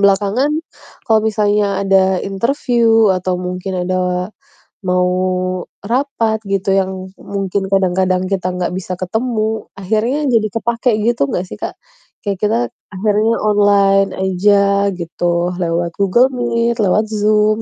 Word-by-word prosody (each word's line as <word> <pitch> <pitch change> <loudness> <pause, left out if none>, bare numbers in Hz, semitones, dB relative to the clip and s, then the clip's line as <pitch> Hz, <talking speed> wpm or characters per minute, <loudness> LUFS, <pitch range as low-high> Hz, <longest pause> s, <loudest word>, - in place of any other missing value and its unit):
belakangan 200 +7 +2 0.6
kalau 220 -1 +4
misalnya 205 -2 +1
ada 190 -1 +3
interview, 225 0 +2
atau 185 0 -1
mungkin 180 0 -3
ada 180 0 -1 0.6
mau 180 0 +2 0.7
rapat 230 -1 0
gitu, 195 0 0
yang 190 -1 -2
mungkin 195 0 -3
kadang-kadang 185 -1 +1
kita 185 -2 -1
nggak 180 -1 -1
bisa 185 0 -4
ketemu, 220 +2 -1
akhirnya 225 +9 0
jadi 220 -2 +3
kepakai 235 +2 0
gitu 235 -11 +2
nggak 180 - -2
sih, - - -8
Kak? - - -4 0.5
Kayak 200 -1 -1
kita 220 +3 +2 0.3
akhirnya 210 +3 +1
online 200 -2 +3
aja 200 +1 +2
gitu, 175 0 -1
lewat 170 0 -1
Google 200 +7 +3
Meet, 235 -1 0
lewat 210 +3 +2
Zoom, 215 0 +2
200 Hz, 125 wpm, -17 LUFS, 185-220 Hz, 0.7 s, kalau